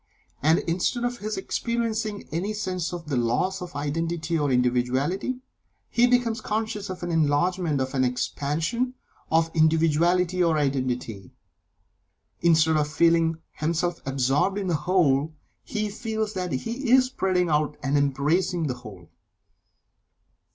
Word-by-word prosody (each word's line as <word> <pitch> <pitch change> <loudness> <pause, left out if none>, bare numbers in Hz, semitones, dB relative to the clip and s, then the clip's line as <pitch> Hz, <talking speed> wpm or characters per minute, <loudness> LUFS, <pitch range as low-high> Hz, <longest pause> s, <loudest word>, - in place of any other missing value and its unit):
And, 160 +4 +4
instead 185 +8 0
of 245 0 -2
his 215 +1 -4
experiencing 220 0 -2
any 185 +7 -2
sense 185 -5 -3
of 175 -2 -6
the 145 -3 -2
loss 125 +11 0
of 180 -2 -8
identity 165 +3 -2
or 145 -3 +1
individuality, 130 - 0 0.5
he 245 +1 +4
becomes 245 -2 +1
conscious 210 -2 -3
of 185 -1 -6
an 175 - -2
enlargement 160 +1 +1
of 130 0 -2
an 130 -1 +2
expansion 160 - -1 0.4
of 165 0 +3
individuality 165 +3 +3
or 165 -2 +2
identity 130 -8 -2 1.1
instead 160 -2 +4
of 150 -1 +1
feeling 165 0 +3
himself 170 +2 -1
absorbed 135 +8 +1
in 195 -3 -2
the - - +1
Whole, 155 -3 +2 0.3
he 215 -1 -2
feels 220 0 -3
that 180 -3 -3
he 230 - -3
is 255 +1 +6
spreading 185 -8 0
out 150 0 +1
and 135 +2 0
embracing 150 +5 +1
the 135 - -1
Whole. 95 -7 -12
165 Hz, 135 wpm, -25 LUFS, 145-195 Hz, 1.1 s, is